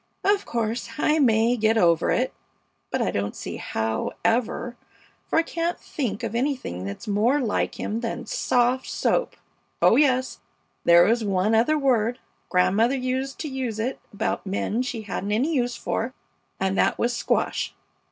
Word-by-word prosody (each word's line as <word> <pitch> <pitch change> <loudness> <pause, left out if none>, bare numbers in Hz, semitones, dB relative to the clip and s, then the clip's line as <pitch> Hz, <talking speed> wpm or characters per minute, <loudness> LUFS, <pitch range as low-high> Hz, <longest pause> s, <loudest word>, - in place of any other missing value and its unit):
Of 400 0 +2
course, 230 0 -2
I 300 +1 +2
may 230 -2 +4
get 220 -1 +2
over 170 -5 +3
it, - - +1 0.6
but - - 0
I - - 0
don't 100 +1 -2
see - - -6
how 110 0 -2
ever, 240 +1 0 0.5
for - - 0
I 325 - +5
can't 335 +1 -2
think 235 -6 -4
of 230 -2 -3
anything 240 - -2
that's 100 - -7
more 220 +8 +2
like 230 -6 -1
him 220 - -2
than 240 +1 -4
soft 245 +3 +1
soap! - - 0 0.4
Oh - - +5
yes, 260 -3 +2 0.5
there 170 0 +7
is 230 +1 +2
one 200 +1 +1
other 240 +8 +3
word. 245 -4 +2 0.3
Grandmother 200 +8 +3
used 260 +1 -2
to 315 - -3
use 260 -5 -3
it 240 +4 -2
about 210 +2 -2
men 205 +4 -1
she 245 -3 -4
hadn't 205 0 -3
any 270 +10 +1
use 245 -4 0
for, 250 +4 -3 0.4
and 190 0 0
that - - +2
was 240 +1 0
"squash." - - -1
235 Hz, 160 wpm, -24 LUFS, 210-260 Hz, 0.6 s, there